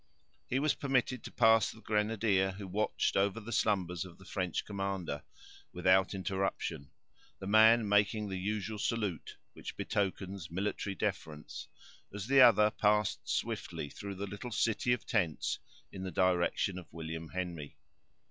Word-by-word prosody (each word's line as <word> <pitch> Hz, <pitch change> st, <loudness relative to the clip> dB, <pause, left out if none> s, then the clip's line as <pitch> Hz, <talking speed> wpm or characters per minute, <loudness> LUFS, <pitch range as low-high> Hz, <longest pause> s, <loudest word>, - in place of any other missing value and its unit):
He 130 Hz, -, 0 dB
was 150 Hz, +2 st, +2 dB
permitted 130 Hz, -3 st, 0 dB
to -, -, -8 dB
pass 110 Hz, 0 st, +5 dB
the 110 Hz, -, -10 dB
grenadier, 105 Hz, -3 st, +1 dB
who 100 Hz, 0 st, -8 dB
watched 105 Hz, +4 st, 0 dB
over 100 Hz, +3 st, +2 dB
the 115 Hz, +2 st, -8 dB
slumbers 90 Hz, -7 st, +1 dB
of 90 Hz, -2 st, -12 dB
the 95 Hz, -, -16 dB
French 90 Hz, -4 st, -2 dB
commander, 95 Hz, -7 st, -3 dB, 0.5 s
without 95 Hz, +2 st, +3 dB
interruption, 95 Hz, -6 st, -2 dB, 0.5 s
the -, -, -8 dB
man 110 Hz, +2 st, +6 dB
making 105 Hz, +1 st, +2 dB
the 95 Hz, -1 st, -4 dB
usual 105 Hz, +2 st, -3 dB
salute 105 Hz, -6 st, -2 dB, 0.2 s
which -, -, -8 dB
betokens 95 Hz, -2 st, -2 dB
military 100 Hz, +2 st, -2 dB
deference, 75 Hz, -4 st, -4 dB, 0.4 s
as 100 Hz, 0 st, -5 dB
the 135 Hz, +2 st, +6 dB
other 105 Hz, -4 st, +7 dB
passed 105 Hz, -1 st, +1 dB
swiftly 70 Hz, -, -2 dB
through 100 Hz, -1 st, -7 dB
the 100 Hz, +2 st, -4 dB
little 105 Hz, +5 st, -7 dB
city 115 Hz, +2 st, +1 dB
of 120 Hz, -, 0 dB
tents, 85 Hz, -9 st, 0 dB, 0.3 s
in 95 Hz, -, -7 dB
the 95 Hz, -, -3 dB
direction 90 Hz, +1 st, +1 dB
of 90 Hz, -, -14 dB
William 80 Hz, 0 st, -6 dB
Henry. 85 Hz, -4 st, -5 dB
100 Hz, 145 wpm, -32 LUFS, 90-110 Hz, 0.5 s, other